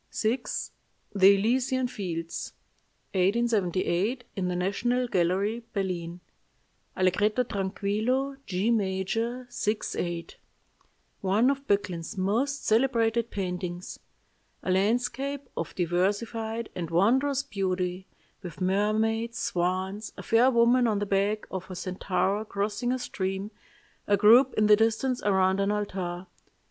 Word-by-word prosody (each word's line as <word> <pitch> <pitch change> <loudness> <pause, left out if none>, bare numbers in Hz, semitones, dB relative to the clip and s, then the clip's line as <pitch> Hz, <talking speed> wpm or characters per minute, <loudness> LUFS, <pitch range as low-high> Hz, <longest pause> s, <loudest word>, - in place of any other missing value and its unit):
"VI. 230 +4 +2 0.7
THE 195 0 +7
ELYSIAN 255 +5 +1
FIELDS 170 -7 -5 0.6
(1878; 200 +1 +1
in 185 -2 -1
the 180 - -1
National 240 +7 0
Gallery, 195 +4 +1
Berlin) 180 -4 -3 0.8
"Allegretto 205 +6 +2
tranquillo, 215 +6 -1
G 195 +5 0
major, 225 +4 -1
6 210 -2 -2
8. 170 -1 -4 0.8
One 210 +7 +3
of 275 0 -5
Böcklin's 185 -4 -1
most 235 +10 0
celebrated 230 -1 +2
paintings. 180 -2 -4 0.6
A 185 - -1
landscape 245 +8 0
of 165 - -4
diversified 215 +6 -1
and 170 -3 -4
wondrous 260 +11 +2
beauty, 185 -5 -2 0.3
with 180 -4 -9
mermaids, 220 +5 +1
swans, 185 +4 -2
a - - -7
fair 235 +3 +4
woman 240 0 +4
on 215 -2 +1
the 205 - -1
back 200 +2 0
of 185 0 -5
a 185 - -6
centaur 190 +2 -1
crossing 210 +3 -2
a 255 - +1
stream, 195 -3 -3 0.6
a 205 - +4
group 235 +6 +6
in 215 - +3
the 210 0 +7
distance 225 +4 +1
around 190 -1 +2
an 200 0 +1
altar. 190 -4 -3
205 Hz, 115 wpm, -27 LUFS, 185-235 Hz, 0.8 s, THE